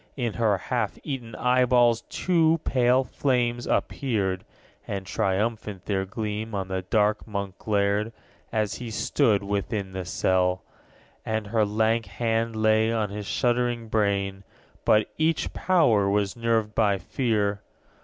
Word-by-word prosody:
In 120 Hz, -4 st, -1 dB
her 110 Hz, -4 st, +2 dB
half 110 Hz, +2 st, -2 dB
eaten 125 Hz, -6 st, -5 dB
eyeballs 125 Hz, -2 st, +3 dB
two 165 Hz, -2 st, +2 dB
pale 125 Hz, 0 st, +3 dB
flames 120 Hz, -2 st, 0 dB
appeared, 100 Hz, -9 st, -1 dB, 0.4 s
And 100 Hz, -1 st, -4 dB
triumphant 105 Hz, 0 st, -2 dB
their 95 Hz, -2 st, -1 dB
gleam 105 Hz, +2 st, -4 dB
on 95 Hz, -1 st, -3 dB
the 95 Hz, 0 st, -2 dB
dark 105 Hz, +3 st, +1 dB
Monk 100 Hz, -2 st, -5 dB
glared, 105 Hz, +1 st, 0 dB, 0.4 s
As 110 Hz, -2 st, 0 dB
he 120 Hz, -2 st, -6 dB
stood 110 Hz, -1 st, +1 dB
within 100 Hz, 0 st, -2 dB
the 95 Hz, 0 st, -4 dB
cell. 90 Hz, +1 st, +1 dB, 0.6 s
_90 -, -, -43 dB
17. 110 Hz, -, -1 dB
And 110 Hz, -1 st, -2 dB
her 110 Hz, -2 st, +3 dB
lank 110 Hz, +2 st, +1 dB
hand 115 Hz, -1 st, -1 dB
lay 110 Hz, +1 st, +3 dB
on 110 Hz, -3 st, -1 dB
his 105 Hz, -1 st, -6 dB
shuddering 120 Hz, -2 st, 0 dB
brain; 100 Hz, -2 st, 0 dB, 0.4 s
But 110 Hz, 0 st, +4 dB
each 160 Hz, +1 st, +1 dB
power 120 Hz, -, +3 dB
was 100 Hz, -1 st, 0 dB
nerved 115 Hz, -2 st, 0 dB
by 105 Hz, -3 st, +2 dB
fear. 105 Hz, 0 st, -1 dB
110 Hz, 140 wpm, -26 LUFS, 100-120 Hz, 0.6 s, But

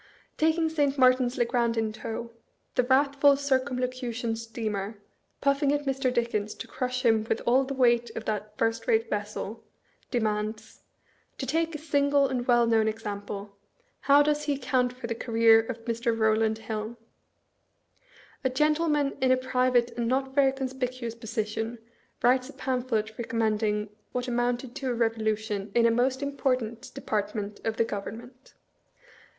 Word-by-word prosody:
Taking 320 Hz, +1 st, +2 dB
St. 290 Hz, -3 st, 0 dB
Martins 255 Hz, -1 st, +4 dB
le 240 Hz, -, +3 dB
grand 235 Hz, -1 st, 0 dB
in 220 Hz, -1 st, 0 dB
tow, 230 Hz, +1 st, -6 dB, 0.4 s
the -, -, +3 dB
wrathful 280 Hz, +2 st, +4 dB
Circumlocution 255 Hz, -4 st, -1 dB
steamer, 220 Hz, -2 st, -4 dB, 0.4 s
puffing 280 Hz, 0 st, +2 dB
at 290 Hz, 0 st, -1 dB
Mr. 270 Hz, -1 st, 0 dB
Dickens 230 Hz, -4 st, -1 dB
to -, -, -7 dB
crush 255 Hz, 0 st, -3 dB
him 225 Hz, -2 st, +4 dB
with -, -, +1 dB
all 260 Hz, +3 st, +4 dB
the 275 Hz, +1 st, -4 dB
weight 240 Hz, -2 st, +3 dB
of 225 Hz, -, -5 dB
that 210 Hz, 0 st, -4 dB
first 225 Hz, 0 st, 0 dB
rate 225 Hz, 0 st, +2 dB
vessel, 210 Hz, +1 st, -4 dB, 0.5 s
de 245 Hz, -, 0 dB
mands, 215 Hz, 0 st, -3 dB, 0.3 s
" -, -, -39 dB
To 265 Hz, -, -3 dB
take 325 Hz, +4 st, 0 dB
a -, -, -2 dB
sragle 285 Hz, -2 st, +2 dB
and 245 Hz, -2 st, -2 dB
well 240 Hz, -1 st, +5 dB
known 225 Hz, -1 st, +3 dB
example, 205 Hz, -2 st, -5 dB, 0.4 s
how 285 Hz, +2 st, +5 dB
does 300 Hz, 0 st, 0 dB
he 290 Hz, -1 st, +1 dB
account 250 Hz, -2 st, +1 dB
for 250 Hz, -1 st, -9 dB
the 230 Hz, -, -2 dB
career 230 Hz, -1 st, +4 dB
of 225 Hz, 0 st, -5 dB
Mr. 230 Hz, 0 st, -1 dB
Eowlajstd 220 Hz, 0 st, +2 dB
Hill? 220 Hz, +1 st, -5 dB, 1.5 s
A 260 Hz, -, +2 dB
gen 300 Hz, +4 st, +3 dB
tleman 300 Hz, -4 st, 0 dB
in 260 Hz, -1 st, +4 dB
a 255 Hz, -, +5 dB
private 250 Hz, -1 st, +2 dB
and 235 Hz, 0 st, -2 dB
not 265 Hz, +2 st, 0 dB
very 270 Hz, -1 st, +4 dB
conspicuous 255 Hz, -3 st, -4 dB
position 225 Hz, 0 st, -3 dB, 0.5 s
writes 255 Hz, +2 st, +3 dB
a -, -, -10 dB
pamphlet 245 Hz, -4 st, -2 dB
recommending 215 Hz, -2 st, 0 dB, 0.2 s
what 250 Hz, 0 st, -2 dB
amounted 245 Hz, 0 st, -1 dB
to 265 Hz, -, -3 dB
a 245 Hz, -, 0 dB
revolution 220 Hz, -3 st, -1 dB
in 235 Hz, -1 st, +5 dB
a 230 Hz, -, +5 dB
most 260 Hz, +3 st, +1 dB
important 255 Hz, -5 st, -2 dB
department 210 Hz, -1 st, -3 dB
of 225 Hz, 0 st, -2 dB
the 230 Hz, -, +3 dB
Government. 240 Hz, +5 st, -8 dB
240 Hz, 155 wpm, -27 LUFS, 225-265 Hz, 1.5 s, well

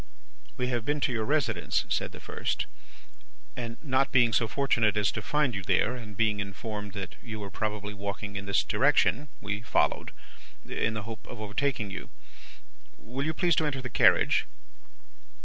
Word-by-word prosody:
"'We 125 Hz, 0 st, 0 dB
have 120 Hz, -3 st, 0 dB
been 145 Hz, +4 st, 0 dB
to 130 Hz, -, +2 dB
your 110 Hz, -2 st, 0 dB
residence,' 120 Hz, -, +1 dB
said -, -, 0 dB
the -, -, -10 dB
first, -, -, -2 dB, 0.9 s
'and 115 Hz, -1 st, -5 dB
not 135 Hz, -2 st, +2 dB
being 120 Hz, -3 st, +5 dB
so 115 Hz, -, +3 dB
fortunate 115 Hz, -6 st, +2 dB
as 105 Hz, -1 st, +3 dB
to 110 Hz, -, -4 dB
find 150 Hz, +1 st, +1 dB
you 100 Hz, -, -2 dB
there, 110 Hz, -, +2 dB
and 105 Hz, -5 st, -9 dB
being 110 Hz, -2 st, +2 dB
informed 105 Hz, +1 st, -5 dB
that 100 Hz, -2 st, -6 dB
you 110 Hz, -2 st, -6 dB
were 100 Hz, -1 st, -6 dB
probably 105 Hz, 0 st, -3 dB
walking 100 Hz, +1 st, -5 dB
in 100 Hz, -1 st, -4 dB
this 100 Hz, -, +3 dB
direction, 145 Hz, +1 st, +3 dB
we 105 Hz, 0 st, -3 dB
followed, 115 Hz, -, +1 dB, 0.6 s
in 115 Hz, -, 0 dB
the 110 Hz, -, -3 dB
hope 110 Hz, +1 st, -8 dB
of 120 Hz, -, -8 dB
overtaking 110 Hz, 0 st, -1 dB
you. -, -, -6 dB, 0.9 s
Will 130 Hz, +5 st, -4 dB
you 160 Hz, -, 0 dB
please 175 Hz, -2 st, +3 dB
to 160 Hz, -, +3 dB
enter 135 Hz, -2 st, -1 dB
the 130 Hz, -1 st, -5 dB
carriage? -, -, +5 dB
110 Hz, 175 wpm, -29 LUFS, 105-130 Hz, 0.9 s, being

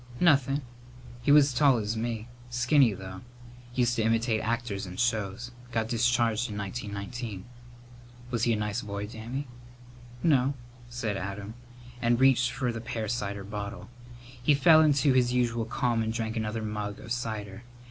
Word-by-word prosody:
"Nothin'. 140 Hz, -4 st, +3 dB, 0.6 s
He 135 Hz, -, +2 dB
was 145 Hz, -1 st, +7 dB
as -, -, -4 dB
tall 135 Hz, 0 st, +5 dB
as 110 Hz, 0 st, -2 dB
me. 115 Hz, 0 st, -3 dB, 0.2 s
Skinny, 125 Hz, +1 st, +4 dB
though. 95 Hz, -1 st, -8 dB, 0.5 s
Used 120 Hz, -1 st, +2 dB
to -, -, +2 dB
imitate 115 Hz, 0 st, +1 dB
actors 115 Hz, -4 st, -2 dB
in 90 Hz, 0 st, -8 dB
shows. 115 Hz, 0 st, -1 dB, 0.2 s
Got 115 Hz, -1 st, -1 dB
discharged 120 Hz, -1 st, +2 dB
in 105 Hz, -, -5 dB
1919." 100 Hz, 0 st, -5 dB, 0.9 s
"Was 120 Hz, -2 st, +1 dB
he 120 Hz, -, +3 dB
a -, -, +2 dB
nice 105 Hz, +2 st, -2 dB
boy, 100 Hz, -1 st, -4 dB
Dammy?" 115 Hz, +6 st, -5 dB, 0.8 s
"No," 140 Hz, -4 st, +3 dB, 0.3 s
said 115 Hz, -4 st, -2 dB
Adam, 100 Hz, +2 st, -5 dB, 0.5 s
and 120 Hz, 0 st, +2 dB
reached 130 Hz, -2 st, +5 dB
for 125 Hz, 0 st, -1 dB
the 115 Hz, -1 st, -5 dB
pear 115 Hz, -2 st, -4 dB
cider 100 Hz, -3 st, -3 dB
bottle. 105 Hz, +2 st, -6 dB, 0.5 s
He 145 Hz, +4 st, +4 dB
fell 155 Hz, +3 st, +7 dB
into 145 Hz, -3 st, +4 dB
his 125 Hz, -1 st, +3 dB
usual 120 Hz, -2 st, +1 dB
calm 120 Hz, 0 st, 0 dB
and 110 Hz, 0 st, -1 dB
drank 110 Hz, -1 st, -3 dB
another 110 Hz, 0 st, -2 dB
mug 105 Hz, -1 st, -4 dB
of 125 Hz, -4 st, -10 dB
cider. 110 Hz, -4 st, -3 dB
115 Hz, 160 wpm, -28 LUFS, 105-125 Hz, 0.9 s, was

